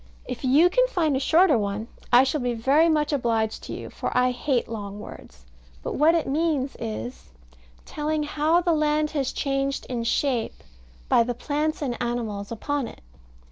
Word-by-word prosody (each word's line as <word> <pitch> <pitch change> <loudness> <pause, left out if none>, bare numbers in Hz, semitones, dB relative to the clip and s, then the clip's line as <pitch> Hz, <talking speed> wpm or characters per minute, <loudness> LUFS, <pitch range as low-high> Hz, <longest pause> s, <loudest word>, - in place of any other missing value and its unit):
If - - -6
you 280 +7 +5
can - - +3
find 325 - +1
a - - +1
shorter 315 -1 +4
one 205 +2 -3 0.2
I 245 +2 +7
shall 270 +2 -1
be 245 -1 -1
very 280 +8 +3
much 300 -1 +1
obliged 225 -5 0
to - - -6
you, - - -7
for - - -3
I 250 0 +3
hate 250 0 -1
long 205 -2 -6
words. - - -12 0.4
But - - -3
what 315 +4 +4
it 330 - +1
means 290 -2 0
is, 110 - -6 0.6
Telling 305 0 -2
how 305 +3 +2
the 345 -1 +2
land 305 0 +1
has 280 -4 -1
changed 275 -1 -2
in 240 -2 -2
shape, 245 0 -1 0.4
by - - +4
the 240 +1 -1
plants 300 +4 -2
and 245 -4 -3
animals 225 -4 -3
upon 275 +3 -2
it. - - -12
270 Hz, 180 wpm, -25 LUFS, 230-305 Hz, 0.6 s, I